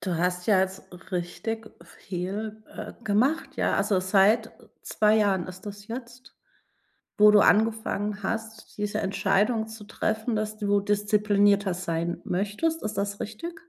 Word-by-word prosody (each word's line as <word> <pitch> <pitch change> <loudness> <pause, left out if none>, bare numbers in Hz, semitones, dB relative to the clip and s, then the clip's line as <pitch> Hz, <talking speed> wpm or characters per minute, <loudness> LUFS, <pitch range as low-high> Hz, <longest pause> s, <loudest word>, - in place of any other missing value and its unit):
Du 180 -3 -2
hast 180 +1 -1
ja 200 -4 +5
jetzt 190 0 -3 0.2
richtig 220 +6 -4
viel, 205 +4 -6
äh, - - -8
gemacht, 245 +10 +1
ja. - - +1
Also 195 -3 +2
seit 205 +4 +3 0.3
2 215 0 +2
Jahren 195 -5 +2
ist 185 +2 -10
das 205 0 -8
jetzt, 245 +2 -9 0.8
wo 210 0 +8
du 210 0 +6
angefangen 210 -1 +2
hast, 220 +1 -5
diese 205 0 -1
Entscheidung 205 +3 +1
zu 220 -1 -10
treffen, 220 +2 -2
dass 215 0 -2
du 205 -1 +1
disziplinierter 205 -1 +2
sein 170 -1 -2
möchtest. 210 - -1
Ist 215 - -3
das 200 0 -2
richtig? 225 +12 -6
205 Hz, 140 wpm, -26 LUFS, 195-220 Hz, 0.8 s, wo